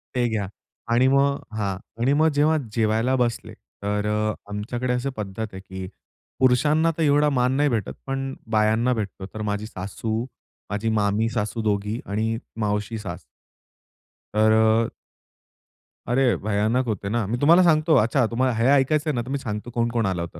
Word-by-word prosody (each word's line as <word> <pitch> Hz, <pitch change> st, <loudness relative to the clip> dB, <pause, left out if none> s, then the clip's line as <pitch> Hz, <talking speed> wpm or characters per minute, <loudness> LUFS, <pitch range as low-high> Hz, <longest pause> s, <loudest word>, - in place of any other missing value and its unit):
ते 125 Hz, -1 st, +2 dB
घ्या 105 Hz, -3 st, -2 dB, 0.5 s
आणि 125 Hz, +2 st, +4 dB
मग 140 Hz, +1 st, +3 dB, 0.2 s
हां, 100 Hz, -3 st, -1 dB, 0.3 s
आणि 135 Hz, +3 st, +3 dB
मग 155 Hz, +2 st, +4 dB
जेव्हा 150 Hz, +2 st, +3 dB, 0.2 s
जेवायला 115 Hz, +3 st, +1 dB
बसले, 120 Hz, -3 st, -1 dB
तर 105 Hz, +1 st, -4 dB
अ, 105 Hz, 0 st, 0 dB, 0.2 s
आमच्याकडे 120 Hz, +5 st, -2 dB
अशी 125 Hz, +2 st, -1 dB
पद्धत 100 Hz, 0 st, -6 dB
आहे 95 Hz, -, -7 dB
की 95 Hz, -1 st, -8 dB, 0.5 s
पुरुषांना 150 Hz, +6 st, +3 dB
तर 165 Hz, -, +1 dB
एवढा 150 Hz, 0 st, +4 dB
मान 125 Hz, -2 st, +1 dB
नाही 145 Hz, 0 st, +3 dB
भेटत, 110 Hz, -6 st, -2 dB
पण 135 Hz, 0 st, -3 dB, 0.2 s
बायांना 110 Hz, +3 st, +2 dB
भेटतो. 100 Hz, -4 st, -4 dB
तर 110 Hz, -, -6 dB
माझी 105 Hz, +1 st, -2 dB
सासू, 110 Hz, +3 st, -4 dB, 0.5 s
माझी 105 Hz, +2 st, -1 dB
मामी 105 Hz, +2 st, +1 dB
सासू 110 Hz, +1 st, -2 dB
दोघी 105 Hz, +1 st, -1 dB
आणि 110 Hz, +2 st, -1 dB, 0.2 s
मावशी 105 Hz, +1 st, -1 dB
सास. 95 Hz, -5 st, -7 dB, 1.1 s
तर 110 Hz, +1 st, +4 dB
अ 110 Hz, +1 st, +3 dB, 1.1 s
अरे 125 Hz, 0 st, +3 dB
भयानक 110 Hz, +5 st, 0 dB
होते 100 Hz, -2 st, -2 dB
ना. 115 Hz, -1 st, 0 dB
मी 120 Hz, +4 st, -1 dB
तुम्हाला 170 Hz, +5 st, +6 dB
सांगतो 155 Hz, -2 st, +4 dB
अच्छा, 120 Hz, +2 st, +3 dB
तुम्हाला 125 Hz, +2 st, 0 dB
हे 115 Hz, +2 st, +1 dB
ऐकायचंय 150 Hz, +3 st, +2 dB
ना, 120 Hz, -, -1 dB
तर 120 Hz, -, -8 dB
मी 140 Hz, -, -1 dB
सांगतो 105 Hz, -3 st, -5 dB
कोण-कोण 115 Hz, -1 st, 0 dB
आलं 95 Hz, -3 st, -1 dB
होतं. 85 Hz, -1 st, -7 dB
115 Hz, 165 wpm, -24 LUFS, 105-130 Hz, 1.1 s, तुम्हाला